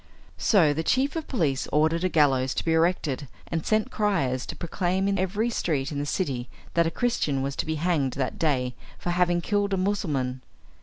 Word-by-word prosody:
So 170 -9 +4
the 160 - -1
chief 265 - +1
of 320 -2 -3
police 150 - 0
ordered 160 +3 +2
a 185 - +2
gallows 135 -5 +3
to - - -2
be 165 - +2
erected, 160 -4 +1 0.2
and 165 -1 -2
sent 215 -1 +1
criers 135 -12 0
to - - -5
proclaim 185 +2 -1
in 200 -1 +1
every 205 +5 0
street 150 -9 -1
in 145 - -3
the 145 - -2
city 135 -8 -2 0.2
that 170 -1 +3
a - - +2
Christian 165 - 0
was 140 0 -2
to - - -2
be 160 - 0
hanged 155 -5 0
that 130 -2 -3
day 130 -6 +1 0.2
for 175 - -3
having 175 -1 +2
killed 205 +1 0
a - - -2
Mussulman. 150 -10 -1
165 Hz, 200 wpm, -26 LUFS, 140-190 Hz, 0.2 s, So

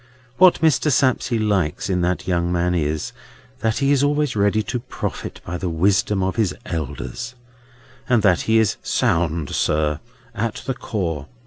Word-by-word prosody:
What 185 -3 +6
Mr. 155 -1 +3
Sapsea 130 -4 +2
likes 100 -8 0
in 90 -2 0
that 90 +1 -1
young 85 -1 0
man 90 0 +1
is, 75 -2 -1 0.5
that 110 0 0
he 140 0 +2
is 140 -2 +3
always 145 -2 +1
ready 105 +1 +2
to 125 +3 -3
profit 125 - -6
by 90 +1 -4
the 90 - -2
wisdom 95 +3 +1
of 95 +4 -2
his 105 -5 +1
elders, 85 - -5 0.7
and 120 -4 +3
that 90 -4 +4
he 110 - +5
is 110 -4 +2
sound, 80 -3 0
sir, 75 -1 +1 0.3
at 110 0 -3
the 135 - -1
core. 85 - -3
100 Hz, 160 wpm, -21 LUFS, 85-120 Hz, 0.7 s, What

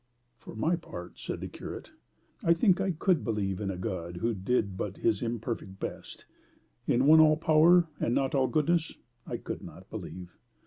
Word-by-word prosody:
"For - - -11
my 160 +10 +1
part," 90 - -9
said - - -5
the - - -4
curate, - - -8 0.5
"I 170 0 +4
think 185 +1 +3
I 190 - 0
COULD 170 0 +1
believe 105 -3 -2
in 100 - -2
a 95 - -3
God 90 -3 -4
who 115 +6 0
did 100 -1 0
but 95 +1 -4
his 110 -4 +1
imperfect 115 -4 -4
best: - - -7 0.6
in 125 +2 +3
one 155 +2 +8
all 155 -1 +6
power, 165 +2 +5
and 115 - 0
not 135 -1 +1
all 135 -2 +3
goodness, 160 +2 +1 0.3
I - - -3
could - - -6
not - - -12
believe. 90 -1 -8
120 Hz, 180 wpm, -29 LUFS, 95-160 Hz, 0.6 s, one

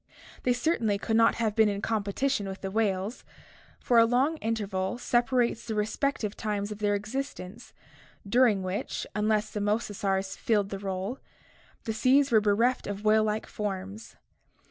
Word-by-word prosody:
They 250 - +2
certainly 240 -6 0
could 220 +2 -1
not 230 0 +5
have 220 -3 -1
been 220 -2 +5
in 200 -1 -2
competition 210 +2 -1
with 190 - -7
the 195 - -4
whales, 205 0 -1 0.6
for 240 -2 +3
a 230 - +7
long 260 +7 +2
interval 205 -3 -2
separates 240 -1 +1
the 220 - -2
respective 215 +1 -1
times 210 -1 -3
of 210 - -6
their 205 -1 +1
existence 220 -1 -6 0.6
during 225 -3 +3
which, 185 +2 -3
unless 210 0 0
the 210 - -3
mosasaurs 200 -2 -1
filled 205 -3 0
the 195 - -4
rdle, 195 +5 -4 0.6
the 220 - -2
seas 265 +5 +3
were 220 -2 +5
bereft 225 +5 +2
of 205 0 -5
whale 215 0 +4
like 215 0 -1
forms. 200 +1 -5
215 Hz, 155 wpm, -28 LUFS, 200-235 Hz, 0.6 s, a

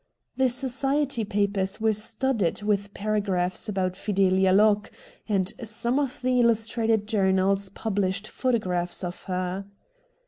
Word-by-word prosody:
The 265 -1 +2
society 265 +1 +1
papers 200 -1 -1
were 220 0 +2
studded 215 -2 -1
with 205 -1 0
para 215 +1 0
graphs 185 -1 -1
about 190 -3 -1
FideUa 190 -1 +2
Locke, 210 0 +3 0.4
and 195 -2 +1
some 235 +4 0
of 265 -3 -3
the 255 0 +2
illustrated 225 -2 +2
journals 195 -2 +2
published 200 -1 -2
photographs 185 -10 -1
of 175 0 -6
her. 185 +1 -3
205 Hz, 125 wpm, -25 LUFS, 190-230 Hz, 0.4 s, Locke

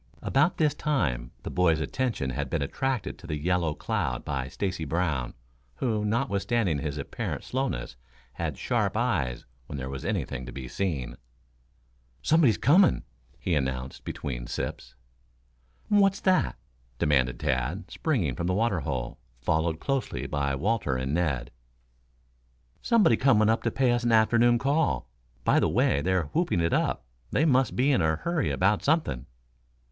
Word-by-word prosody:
About 150 +6 +2
this 150 -2 +3
time 65 - -1
the - - -5
boys' 85 -3 +3
attention 110 - -1
had 60 - -3
been - - 0
attracted 130 - -2
to 90 - -11
the 75 -2 -2
yellow 85 0 0
cloud - - -2
by 65 -3 -2
Stacy 90 +3 -3
Brown, 75 -5 -1 0.4
who, 110 -4 -1
notwithstanding 105 - 0
his 75 -1 -3
apparent 70 - -4
slowness, 130 - -3 0.4
had - - -3
sharp 110 -5 0
eyes 90 - 0 0.2
when 70 - -6
there 65 0 -4
was 65 -1 -6
anything 65 - -2
to - - -6
be 65 -1 -7
seen. 80 -7 -3 1.1
"Somebody's 150 - +4
coming," 175 - +4 0.3
he 90 - -2
announced 65 -3 -2
between - - -5
sips. - - -5 0.9
"What's 200 -2 +4
that?" 185 -1 +2 0.4
demanded 65 -4 +2
Tad, 65 +10 -2
springing 110 - 0
from 85 - -2
the 90 - +1
water 105 -4 +1
hole, 65 -4 -4 0.2
followed 80 +2 0
closely 135 -2 -2
by 70 -2 -1
Walter 90 - 0
and 65 +2 -2
Ned. 75 -8 0 1.3
"Somebody 210 - +4
coming 110 -4 +4
to - - -2
pay 130 -2 +2
us 120 0 +1
an 120 - +2
afternoon 115 +2 +5
call. 140 - +1 0.4
By - - +4
the - - +2
way 70 - +2
they're 95 +2 +1
whooping 160 - +1
it 85 0 +1
up - - 0 0.2
they 150 - +2
must 130 -5 +3
be 135 +4 +3
in 115 - +3
a 80 0 +2
hurry 170 - -1
about 100 +3 +2
something." 140 - 0
90 Hz, 150 wpm, -27 LUFS, -, 1.3 s, afternoon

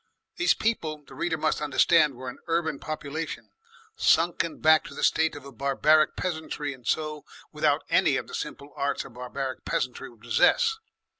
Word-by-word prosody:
These 350 +1 +3
people, 155 -10 -2
the - - -14
reader 165 -2 -1
must 150 - 0
understand, 150 -1 +4
were 130 +1 -8
an 125 - -7
urban 160 -3 0
population 155 +1 -5 0.4
sunken 170 - +2
back 155 0 +5
to - - -10
the - - -5
state 160 -1 +2
of 145 - -10
a 140 - -9
barbaric 140 +4 +3
peasantry, 155 -4 -3
and 125 -3 -14
so 155 -1 -1 0.3
without - - +1
any - - +3
of - - -4
the - - -12
simple 140 +1 -6
arts 140 0 -1
a - - -11
barbaric 125 +2 -5
peasantry 125 -1 -2
would 115 -3 -20
possess. 445 - +3
150 Hz, 170 wpm, -27 LUFS, 140-160 Hz, 0.4 s, back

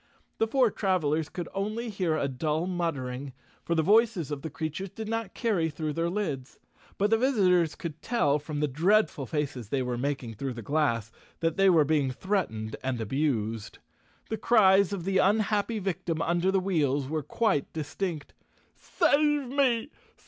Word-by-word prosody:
The 225 - +2
four 250 -1 +3
travelers 160 -7 0
could 175 -2 -5
only 215 +4 -3
hear 180 -6 0
a 140 - 0
dull 150 +5 -1
muttering, 140 -7 -3 0.3
for 170 - -1
the 160 - +2
voices 210 - +3
of 145 -2 -3
the 160 - -5
creatures 160 +6 -4
did 220 +3 -7
not 225 -3 -3
carry 200 -9 +1
through 155 0 -3
their 165 +2 0
lids, 155 -10 -3 0.4
but 205 +2 +1
the 225 - +4
visitors 185 - +3
could 160 -2 -7
tell 150 - +1
from 145 0 -5
the 150 - +2
dreadful 165 - +2
faces 135 -6 -3
they 135 0 0
were 125 -1 -3
making 135 -4 -2
through 130 +4 -4
the 115 -1 -8
glass 115 -5 0 0.3
that 165 -1 +1
they 195 0 +5
were 160 -5 +5
being 145 -3 +2
threatened 130 - -2
and 130 -2 -2
abused. 115 -3 -2 0.5
The 220 - 0
cries 200 -4 +5
of 195 -4 -3
the 190 +1 +1
unhappy 210 +2 +2
victim 180 -4 -2
under 175 +2 +1
the 195 - +2
wheels 145 -8 0
were 155 +2 -2
quite 150 -3 0
distinct. 155 0 -4 0.4
"Save 295 -5 +1
me! 265 -1 +1
165 Hz, 170 wpm, -28 LUFS, 145-200 Hz, 0.5 s, they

